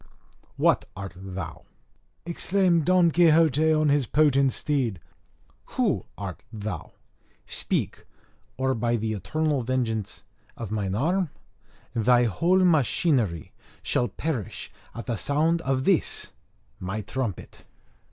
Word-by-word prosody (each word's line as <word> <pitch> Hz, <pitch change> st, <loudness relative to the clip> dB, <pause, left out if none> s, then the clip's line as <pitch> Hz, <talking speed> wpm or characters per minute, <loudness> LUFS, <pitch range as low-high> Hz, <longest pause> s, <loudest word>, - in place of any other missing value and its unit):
_ -, -, -25 dB, 0.5 s
"What -, -, +3 dB
art 100 Hz, -2 st, -6 dB
thou?" 90 Hz, -3 st, -7 dB, 0.6 s
exclaimed 175 Hz, -1 st, +2 dB
Don 180 Hz, -1 st, +4 dB
Quixote 160 Hz, -2 st, +4 dB
on 155 Hz, -1 st, +3 dB
his 140 Hz, -4 st, +2 dB
potent 140 Hz, -2 st, +3 dB
steed. 125 Hz, -, -1 dB, 0.8 s
"Who -, -, +1 dB
art 100 Hz, -3 st, -6 dB
thou? 105 Hz, -7 st, -6 dB, 0.5 s
Speak! -, -, -2 dB, 0.5 s
or, 130 Hz, 0 st, +1 dB
by 120 Hz, 0 st, 0 dB
the 110 Hz, -1 st, -1 dB
eternal 150 Hz, -, -1 dB
vengeance 115 Hz, -4 st, -2 dB, 0.3 s
of 115 Hz, -4 st, -6 dB
mine 100 Hz, -3 st, -1 dB
arm, 175 Hz, -, +1 dB, 0.6 s
thy 120 Hz, +2 st, +4 dB
whole 175 Hz, -, +3 dB
machinery 135 Hz, -, +2 dB, 0.3 s
shall 120 Hz, -, +1 dB
perish 125 Hz, -, -4 dB, 0.2 s
at 115 Hz, -, -6 dB
sound 160 Hz, +4 st, +1 dB
of 130 Hz, -2 st, 0 dB
this 185 Hz, +1 st, 0 dB, 0.5 s
my 95 Hz, +4 st, -3 dB
trumpet!" 105 Hz, 0 st, -5 dB
130 Hz, 115 wpm, -26 LUFS, 110-160 Hz, 0.8 s, Don